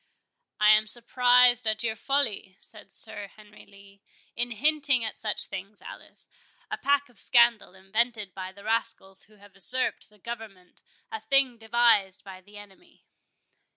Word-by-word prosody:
"I 210 0 +6
am 215 0 +4
surprised 245 +1 +3
at 215 +1 0
your 220 -1 -1
folly," 220 -7 -1
said 215 - -14
Sir 220 -2 -3
Henry 210 +1 -18
Lee, 200 0 -19 0.3
"in 240 +1 0
hinting 270 0 +2
at 220 - -4
such 215 -2 -1
things, 195 +2 -8
Alice; - - -10 0.4
a - - -2
pack 285 +1 +1
of 240 -4 -17
scandal, 235 -6 +3
invented 210 +1 -2
by 185 -1 -7
the 200 +1 -16
rascals 220 -3 -2
who 215 - -23
have 205 -1 -19
usurped 250 +7 -1
the 210 - -24
government—a 225 - -11
thing 270 -4 +2
devised 225 -4 +2
by 190 -2 -12
the 205 +2 -16
enemy." 205 - -17
220 Hz, 150 wpm, -26 LUFS, 200-240 Hz, 0.4 s, I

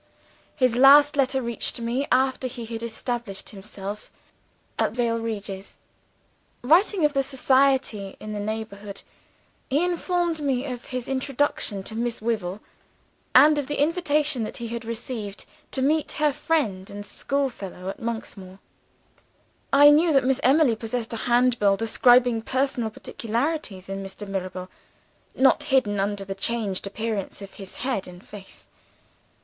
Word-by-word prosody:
His 255 -5 +2
last 285 +3 +7
letter 265 -1 +1
reached 235 +1 -1
me, 240 +4 -1
after 260 0 +2
he 240 -2 -7
had 225 0 -6
established 235 -2 -4
himself 200 0 -7 0.7
at - - +1
Vale 230 -1 0
Regis. 200 -4 -6 0.9
Writing 345 - +4
of 295 - +2
the 275 - +2
society 265 -6 +1
in 215 0 -6
the 210 - -4
neighborhood, 210 -1 -5 0.7
he 290 +5 +2
informed 350 -1 0
me 270 -3 0
of 250 -3 -6
his 255 -2 -5
introduction 265 -6 -1
to 220 - -5
Miss 235 0 -2
Wyvil, 210 -4 -2 0.7
and 295 +3 +7
of 280 - -3
the 295 - -3
invitation 300 -3 +1
that 215 - -4
he 235 -1 -5
had 235 0 -5
received 225 -3 -5 0.2
to 265 - -2
meet 305 +2 +1
her 300 -1 +1
friend 265 -11 -1
and 205 0 -7
schoolfellow 205 -7 -3
at 195 - -5
Monksmoor. 210 -5 -5 1.1
I 290 +1 +8
knew 320 +3 +4
that 270 -1 +4
Miss 265 0 +2
Emily 270 -2 +4
possessed 225 +1 -4
a 230 +2 -4
Handbill 240 -5 +3
describing 240 +1 +4
personal 255 -1 -1
peculiarities 230 - -3
in 195 0 -5
Mr. 195 +2 -7
Mirabel, 185 -1 -4 0.7
not 265 0 +4
hidden 260 -8 +1
under 200 0 -2
the 195 - -4
changed 200 -1 -2
appearance 215 -1 -3
of 195 - -11
his 195 -2 -9
head 255 -8 -1
and 180 0 -12
face. 200 -2 -12
235 Hz, 145 wpm, -25 LUFS, 205-275 Hz, 1.1 s, I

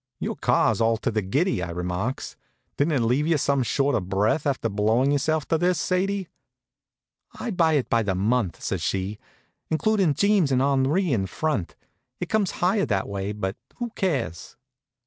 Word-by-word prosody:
"Your - - -3
car's - - +2
all 115 0 +3
to 115 - -2
the 110 -1 0
giddy," 135 - 0
I 85 - -3
remarks. 90 +8 -3 0.4
"Didn't 150 +3 +1
it 140 - +2
leave 125 +7 +1
you 165 -2 +3
some 140 -1 +1
short 140 +3 +1
of 95 -4 -1
breath 105 +10 +1
after 135 -4 0
blowin' 110 +6 +2
yourself 155 +1 0
to 165 - +2
this, 180 -1 +2
Sadie?" 190 +1 0 1.1
"I 240 - -3
buy 165 -4 +3
it 145 -4 +1
by 115 - +2
the 100 -4 -1
month," 105 -1 0
says - - -2
she, 95 +2 -2 0.5
"including 185 -1 +2
Jeems 200 -4 +3
and 130 - +3
Henri 140 +5 +2
in 95 -5 0
front. 100 - -2 0.4
It 180 - -4
comes 210 -4 +1 0.2
higher 195 +2 +2
that 95 -4 0
way; 100 0 -3
but 100 -1 -4 0.2
who 240 -2 -4
cares?" 140 - -3
135 Hz, 175 wpm, -25 LUFS, 105-165 Hz, 1.1 s, all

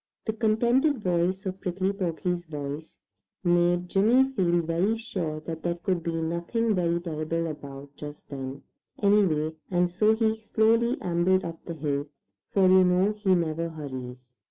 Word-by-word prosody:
The 220 - -1
contented 235 +4 +2
sound 180 +1 +1
of 190 0 -4
Prickly 190 +2 -1
Porky's 175 -2 -2
voice 145 +1 -6 0.5
made 175 0 +2
Jimmy 220 +8 +4
feel 175 -9 +1
very 175 +7 +1
sure 180 -10 -4
that 160 0 -6
there 170 +1 -1
could 175 0 -1
be 165 0 -3
nothing 170 +8 0
very 170 -2 +1
terrible 165 0 -2
about 140 -2 -8
just 145 0 -9
then, 135 -1 -6 0.4
anyway, 180 -7 +3 0.2
and 175 -1 +1
so 215 +4 +3
he 220 -1 +2
slowly 225 +2 +2
ambled 180 +2 +2
up 165 -1 -7
the 170 - -5
hill, 145 -1 -2 0.4
for 195 -2 +3
you 185 0 +7
know 180 +3 +3
he 205 -3 +2
never 165 -1 -1
hurries. 130 -5 -8
175 Hz, 155 wpm, -27 LUFS, 160-200 Hz, 0.5 s, you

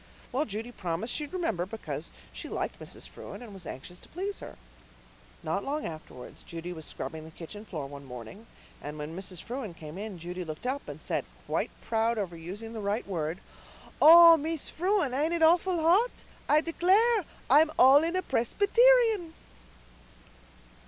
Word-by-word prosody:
Well, 275 +5 0
Judy 220 +3 -5
promised 185 +2 -3
she'd 295 -1 -3
remember, 225 - -1
because 160 -8 -6 0.2
she - - -7
liked - - -3
Mrs. - - -8
Frewen 200 +5 -10
and 220 -4 -10
was 190 -3 -8
anxious 175 +7 -8
to - - -17
please 390 +4 -4
her. - - -10 0.9
Not - - -1
long 295 +2 -2
afterwards 155 -6 -9
Judy 170 +1 -7
was 160 -2 -8
scrubbing 160 -1 -6
the 160 - -10
kitchen 180 +6 -9
floor 155 -9 -5
one 140 0 -9
morning, 125 - -10 0.3
and 150 +1 -6
when 150 +2 -6
Mrs. 185 -2 -5
Frewen 235 -7 -5
came 155 +2 -9
in 210 -3 -6
Judy 175 +2 -5
looked 155 +5 -7
up 270 +3 -2
and - - -8
said, - - -1 0.2
quite - - -1
proud 225 +1 0
over 190 -5 -3
using 195 +8 -7
the 220 - -5
right 205 +3 -1
word, 165 -2 -3 0.6
'Oh, 335 +1 +10
Mees 320 0 -3
Frewen, 360 -6 +1
ain't 310 +6 +1
it 330 - +1
awful 345 +2 +4
hot? 370 +10 +3 0.3
I 300 +1 +6
declare 390 +7 +3 0.2
I'm 300 +4 +6
all 270 +3 +8
in 335 +2 0
a 370 - 0
Presbyterian. 425 - +3
225 Hz, 170 wpm, -29 LUFS, -, 0.9 s, Oh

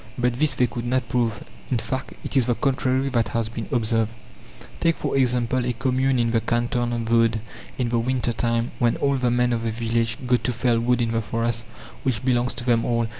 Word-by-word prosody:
But 125 0 0
this 155 -3 +2
they 125 - +3
could 120 0 -5
not 130 0 0
prove; 115 -3 0 0.3
in 125 - +1
fact, 130 +3 -4
it - - -5
is 130 -3 +3
the 120 - +2
contrary 130 0 +1
that 120 -3 +1
has 115 -2 -1
been 115 0 -5
observed. 115 -3 +1 0.7
Take 165 -1 +2
for - - -2
example 125 -1 +1
a 120 0 -1
commune 130 +2 +1
in 115 -1 +1
the 115 -1 +2
canton 120 +1 0
of 120 -1 -1
Vaud, 115 0 +2 0.4
in 125 -2 0
the 120 0 +1
winter 125 0 0
time, 115 0 0
when 120 -1 +3
all 140 -1 +1
the 125 -1 +1
men 120 0 +2
of 115 - -1
the 115 - -1
village 115 0 0
go 125 0 +4
to 125 - -2
fell 120 0 +1
wood 120 +1 +2
in 115 - -1
the 115 0 0
forest, 115 +1 -1 0.4
which 125 -3 -1
belongs 125 -1 +1
to 125 - -5
them 120 -2 +2
all. 115 -1 +1
120 Hz, 225 wpm, -24 LUFS, 115-125 Hz, 0.7 s, go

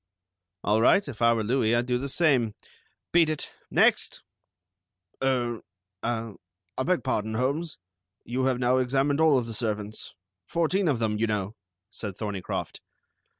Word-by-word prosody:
"All 105 +2 +2
right. 195 - +4
If 130 -5 -8
I 115 0 +6
were 115 -2 +1
Louis 115 0 +2
I'd 120 +1 +1
do 125 0 0
the 140 +2 -4
same. 130 -9 +2 0.6
Beat 165 -2 +5
it. 155 - -4 0.2
Next!" - - +2 1.0
"Er, 120 -3 0 0.4
ah, 115 -2 -2 0.4
I - - -2
beg 170 -2 +1
pardon, 110 +1 -1
Holmes, 140 +7 -1 0.5
you 130 +2 -1
have 130 -2 +2
now 125 +1 +2
examined 135 +3 +1
all 155 -4 +5
of 125 - 0
the 115 - -6
servants. 105 -1 -3 0.3
Fourteen 170 +3 +1
of 140 -6 +2
them, 110 -2 -1
you 115 - +2
know," 105 0 -2 0.4
said 100 -3 -6
Thorneycroft. 100 -4 -4
120 Hz, 150 wpm, -27 LUFS, 110-140 Hz, 1.0 s, I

